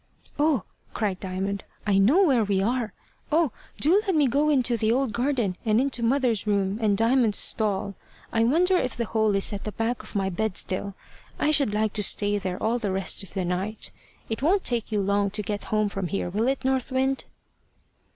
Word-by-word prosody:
"Oh!" 290 Hz, -, +2 dB, 0.3 s
cried 200 Hz, -4 st, -1 dB
Diamond, 195 Hz, +1 st, -3 dB, 0.2 s
"I 200 Hz, -2 st, +3 dB
know 260 Hz, -, +5 dB
now 385 Hz, -, +5 dB
where 250 Hz, -6 st, +3 dB
we 200 Hz, -2 st, 0 dB
are. 230 Hz, +2 st, -1 dB, 0.4 s
Oh! 315 Hz, -3 st, +3 dB, 0.3 s
do 355 Hz, +8 st, +4 dB
let 380 Hz, -, +1 dB
me 300 Hz, -2 st, +4 dB
go 285 Hz, +5 st, +2 dB
into 255 Hz, -5 st, +3 dB
the 220 Hz, -1 st, +1 dB
old 255 Hz, -2 st, 0 dB
garden, 240 Hz, -6 st, 0 dB
and 215 Hz, 0 st, +2 dB
into 265 Hz, -2 st, 0 dB
mother's 235 Hz, -4 st, +1 dB
room, 200 Hz, 0 st, 0 dB
and 205 Hz, -2 st, +2 dB
Diamond's 230 Hz, -1 st, +3 dB
stall. 200 Hz, -2 st, +1 dB, 0.4 s
I 225 Hz, -, +3 dB
wonder 345 Hz, +10 st, +3 dB
if 255 Hz, -7 st, -2 dB
the 235 Hz, -, -1 dB
hole 220 Hz, -2 st, +1 dB
is 195 Hz, +2 st, +1 dB
at 200 Hz, -, -5 dB
the 215 Hz, -, -4 dB
back 225 Hz, +4 st, -2 dB
of -, -, -13 dB
my 195 Hz, -1 st, 0 dB
bed 220 Hz, +1 st, -2 dB
still. 195 Hz, +1 st, -4 dB, 0.4 s
I 305 Hz, -, +1 dB
should 280 Hz, -7 st, +2 dB
like 215 Hz, 0 st, 0 dB
to 210 Hz, -, +2 dB
stay 205 Hz, +1 st, +3 dB
there 185 Hz, -2 st, -4 dB
all 230 Hz, +2 st, 0 dB
the 205 Hz, -4 st, -2 dB
rest 190 Hz, +1 st, +1 dB
of 195 Hz, -, -11 dB
the 190 Hz, -2 st, -1 dB
night. 190 Hz, +5 st, -3 dB, 0.4 s
It 225 Hz, -, -4 dB
won't 375 Hz, +7 st, +2 dB
take 235 Hz, -2 st, 0 dB
you 210 Hz, -2 st, +1 dB
long 200 Hz, +1 st, +1 dB
to 210 Hz, +2 st, -3 dB
get 205 Hz, 0 st, -4 dB
home 215 Hz, -1 st, +1 dB
from 195 Hz, -2 st, -3 dB
here, 175 Hz, 0 st, -3 dB
will 215 Hz, +5 st, 0 dB
it, 265 Hz, 0 st, -1 dB
North 265 Hz, 0 st, 0 dB
Wind?" 265 Hz, +1 st, 0 dB
220 Hz, 210 wpm, -25 LUFS, 200-260 Hz, 0.4 s, know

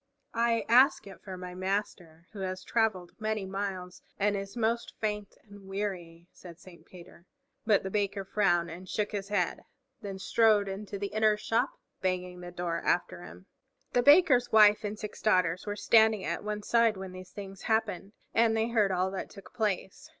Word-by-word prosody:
"I 230 Hz, 0 st, +1 dB
ask 255 Hz, +4 st, +5 dB
it 195 Hz, -2 st, -12 dB
for 190 Hz, -2 st, -8 dB
my 180 Hz, 0 st, -7 dB
Master, 180 Hz, -3 st, -4 dB
who 210 Hz, -, -10 dB
has 185 Hz, -1 st, -4 dB
traveled 200 Hz, -7 st, 0 dB
many 215 Hz, -2 st, -2 dB
miles 190 Hz, -2 st, -5 dB, 0.2 s
and 205 Hz, +1 st, +1 dB
is 195 Hz, +3 st, -6 dB
most 230 Hz, +1 st, -1 dB
faint 210 Hz, -2 st, -3 dB
and 200 Hz, -2 st, -15 dB
weary," 180 Hz, -4 st, -5 dB
said 170 Hz, -3 st, -12 dB
Saint 175 Hz, -1 st, -16 dB
Peter. 175 Hz, 0 st, -15 dB, 0.4 s
But 210 Hz, -3 st, +4 dB
the 190 Hz, -, -4 dB
Baker 200 Hz, -1 st, -1 dB
frowned 175 Hz, -4 st, +1 dB
and 180 Hz, +2 st, -10 dB
shook 210 Hz, -1 st, -1 dB
his 200 Hz, -2 st, -4 dB
head, 190 Hz, -4 st, -1 dB, 0.4 s
then 195 Hz, -2 st, -6 dB
strode 210 Hz, +1 st, +3 dB
into 200 Hz, +1 st, -5 dB
the 200 Hz, 0 st, -5 dB
inner 215 Hz, -1 st, +3 dB
shop, 225 Hz, +4 st, -1 dB, 0.2 s
banging 180 Hz, -1 st, -2 dB
the 175 Hz, 0 st, -8 dB
door 175 Hz, -1 st, -3 dB
after -, -, 0 dB
him. -, -, -12 dB, 0.5 s
The 245 Hz, -, +4 dB
Baker's 275 Hz, -3 st, +5 dB
wife 210 Hz, 0 st, +6 dB
and 210 Hz, 0 st, -4 dB
six 210 Hz, 0 st, -8 dB
daughters 185 Hz, -3 st, +1 dB
were 205 Hz, -, -2 dB
standing 220 Hz, -2 st, +4 dB
at -, -, -3 dB
one 210 Hz, 0 st, -4 dB
side 230 Hz, -2 st, +3 dB
when 190 Hz, -1 st, -7 dB
these 185 Hz, 0 st, -10 dB
things 195 Hz, -1 st, -9 dB
happened, 220 Hz, -3 st, -1 dB, 0.2 s
and 225 Hz, 0 st, +3 dB
they 220 Hz, +1 st, 0 dB
heard 215 Hz, -4 st, +2 dB
all 185 Hz, +1 st, 0 dB
that 190 Hz, -, -5 dB
took 195 Hz, -, -14 dB
place. 210 Hz, +6 st, -3 dB
200 Hz, 180 wpm, -29 LUFS, 185-215 Hz, 0.5 s, wife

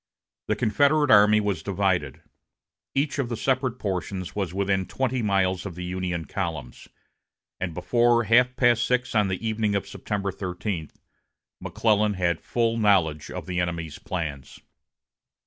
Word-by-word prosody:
The -, -, +1 dB
Confederate 145 Hz, +5 st, +3 dB
army 105 Hz, 0 st, +7 dB
was 100 Hz, -5 st, -1 dB
divided. 95 Hz, -7 st, -1 dB, 0.7 s
Each 140 Hz, +1 st, 0 dB
of 130 Hz, -4 st, -1 dB
the 120 Hz, -, -3 dB
separate 130 Hz, -1 st, 0 dB
portions 95 Hz, -3 st, -4 dB
was 95 Hz, -5 st, -2 dB
within 95 Hz, 0 st, 0 dB
twenty 130 Hz, -1 st, -1 dB
miles 95 Hz, -3 st, +1 dB
of 95 Hz, -4 st, -7 dB
the 90 Hz, -, -6 dB
Union 90 Hz, -2 st, -3 dB
columns; 60 Hz, -3 st, -5 dB, 0.7 s
and 90 Hz, -3 st, -3 dB
before 120 Hz, +5 st, +3 dB
half 125 Hz, +3 st, +4 dB
past 120 Hz, -2 st, +3 dB
six 125 Hz, +1 st, 0 dB
on 105 Hz, -3 st, +3 dB
the 95 Hz, +4 st, -3 dB
evening 110 Hz, -2 st, 0 dB
of 100 Hz, -, -2 dB
September 100 Hz, -2 st, -3 dB
13, 90 Hz, -2 st, -4 dB, 0.7 s
McClellan 105 Hz, -2 st, +1 dB
had 85 Hz, -3 st, 0 dB
full 115 Hz, -1 st, 0 dB
knowledge 90 Hz, -8 st, +2 dB
of -, -, -6 dB
the 90 Hz, -1 st, -2 dB
enemy's 85 Hz, -3 st, -3 dB
plans. 75 Hz, -7 st, -5 dB
100 Hz, 145 wpm, -25 LUFS, 90-115 Hz, 0.7 s, army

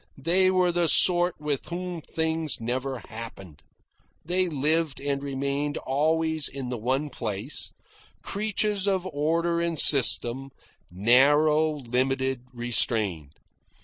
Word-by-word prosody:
They 180 Hz, +6 st, +2 dB
were 185 Hz, -1 st, +2 dB
the 175 Hz, -1 st, +1 dB
sort 175 Hz, +3 st, +3 dB
with 150 Hz, -2 st, -3 dB
whom 175 Hz, -1 st, -5 dB
things 160 Hz, -1 st, -2 dB
never 125 Hz, +2 st, -4 dB
happened. 100 Hz, -9 st, -10 dB, 0.6 s
They 180 Hz, +2 st, +1 dB
lived 155 Hz, -1 st, 0 dB
and 140 Hz, 0 st, -3 dB
remained 140 Hz, +1 st, -3 dB
always 160 Hz, +2 st, 0 dB
in 135 Hz, -2 st, -6 dB
the 125 Hz, -, -4 dB
one 135 Hz, +6 st, -2 dB
place, 110 Hz, +5 st, -5 dB, 0.5 s
creatures 210 Hz, -1 st, -2 dB
of 190 Hz, -2 st, 0 dB
order 170 Hz, +1 st, -1 dB
and 170 Hz, -1 st, -2 dB
system, 130 Hz, -1 st, +5 dB, 0.4 s
narrow, 145 Hz, -, +3 dB
limited, 130 Hz, -1 st, -2 dB
restrained. 110 Hz, -, -1 dB
145 Hz, 115 wpm, -25 LUFS, 125-165 Hz, 0.6 s, system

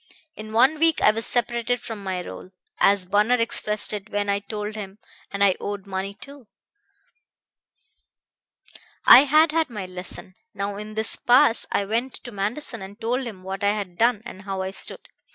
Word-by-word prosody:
In 215 Hz, 0 st, -9 dB
one 260 Hz, +7 st, +4 dB
week 325 Hz, -1 st, +3 dB
I -, -, +5 dB
was 225 Hz, +1 st, 0 dB
separated 240 Hz, 0 st, +1 dB
from 225 Hz, -3 st, -7 dB
my 185 Hz, -2 st, -3 dB
roll, -, -, -9 dB, 0.3 s
as 200 Hz, -2 st, +4 dB
Bunner 210 Hz, +6 st, +3 dB
expressed 215 Hz, -3 st, -1 dB
it 210 Hz, 0 st, -6 dB
when 205 Hz, -1 st, -2 dB
I 200 Hz, -, 0 dB
told 210 Hz, +1 st, -5 dB
him; 200 Hz, -2 st, -7 dB, 0.3 s
and 200 Hz, 0 st, 0 dB
I 195 Hz, -2 st, +4 dB
owed 205 Hz, -1 st, -5 dB
money, 195 Hz, +1 st, -4 dB
too. 280 Hz, +2 st, -13 dB, 2.6 s
I 275 Hz, -, +10 dB
had 310 Hz, +3 st, +4 dB
had 325 Hz, -1 st, +1 dB
my 210 Hz, -5 st, -6 dB
lesson. 185 Hz, 0 st, -7 dB, 0.2 s
Now 200 Hz, 0 st, -3 dB
in 210 Hz, +1 st, -8 dB
this 220 Hz, +1 st, +1 dB
pass 245 Hz, 0 st, +4 dB
I 200 Hz, -, 0 dB
went 235 Hz, +5 st, -2 dB
to 240 Hz, -, -10 dB
Manderson 225 Hz, +4 st, -1 dB
and 195 Hz, +3 st, -10 dB
told 245 Hz, +3 st, -2 dB
him 195 Hz, -5 st, -9 dB
what 190 Hz, +1 st, -6 dB
I 200 Hz, 0 st, +3 dB
had 200 Hz, -4 st, -5 dB
done 230 Hz, -2 st, +2 dB
and 190 Hz, -, -9 dB
how 195 Hz, -1 st, -4 dB
I 190 Hz, -, -4 dB
stood. 195 Hz, -, -6 dB
210 Hz, 180 wpm, -24 LUFS, 200-240 Hz, 2.6 s, I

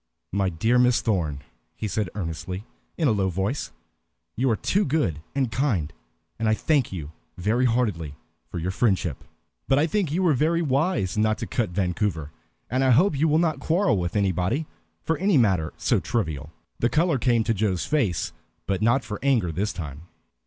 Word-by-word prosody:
"My 95 Hz, 0 st, +1 dB
dear 110 Hz, +9 st, +2 dB
Miss 125 Hz, -1 st, +4 dB
Thorn," 80 Hz, -10 st, -1 dB, 0.3 s
he 110 Hz, -, -3 dB
said 105 Hz, -2 st, -1 dB
earnestly, 90 Hz, +2 st, -4 dB, 0.3 s
in 160 Hz, -, +2 dB
a -, -, +4 dB
low 100 Hz, -3 st, +1 dB
voice, 95 Hz, -, -2 dB, 0.6 s
"you 130 Hz, +3 st, +1 dB
are 115 Hz, -, +3 dB
too 200 Hz, -, +1 dB
good 135 Hz, -, 0 dB
and 130 Hz, -4 st, 0 dB
kind, 105 Hz, -, 0 dB, 0.5 s
and 115 Hz, -1 st, +1 dB
I 110 Hz, -, +3 dB
thank 145 Hz, -1 st, +1 dB
you 80 Hz, -6 st, -6 dB, 0.3 s
very 110 Hz, +8 st, +1 dB
heartily 105 Hz, -, 0 dB, 0.3 s
for -, -, -6 dB
your 85 Hz, +2 st, -2 dB
friendship. 95 Hz, -, 0 dB, 0.4 s
But 135 Hz, -, +3 dB
I 150 Hz, -, +4 dB
think 180 Hz, -2 st, 0 dB
you 180 Hz, +4 st, +1 dB
were 170 Hz, -4 st, +4 dB
very 165 Hz, +5 st, +2 dB
wise 140 Hz, -, 0 dB
not 110 Hz, 0 st, +2 dB
to -, -, -4 dB
cut 120 Hz, -5 st, -1 dB
Vancouver, 90 Hz, -3 st, -1 dB, 0.4 s
and 130 Hz, +2 st, 0 dB
I 130 Hz, -, +3 dB
hope 155 Hz, +8 st, +4 dB
you 150 Hz, +4 st, +2 dB
will 155 Hz, 0 st, +3 dB
not 160 Hz, -2 st, +1 dB
quarrel 165 Hz, -, +2 dB
with 85 Hz, +2 st, -3 dB
anybody 100 Hz, -, +1 dB, 0.4 s
for 160 Hz, -2 st, -1 dB
any 190 Hz, -3 st, +3 dB
matter 95 Hz, -10 st, +2 dB
so -, -, +2 dB
trivial." 80 Hz, -, -2 dB, 0.3 s
The 120 Hz, -, +2 dB
color 160 Hz, -2 st, +2 dB
came 115 Hz, -1 st, +2 dB
to 115 Hz, -, +1 dB
Joe's 95 Hz, -4 st, 0 dB
face, 115 Hz, -, 0 dB, 0.3 s
but 95 Hz, 0 st, -1 dB
not 120 Hz, +5 st, +3 dB
for 105 Hz, -3 st, -6 dB
anger 125 Hz, -11 st, +2 dB
this 100 Hz, +6 st, -1 dB
time. 75 Hz, 0 st, -7 dB
110 Hz, 185 wpm, -25 LUFS, 90-140 Hz, 0.6 s, Miss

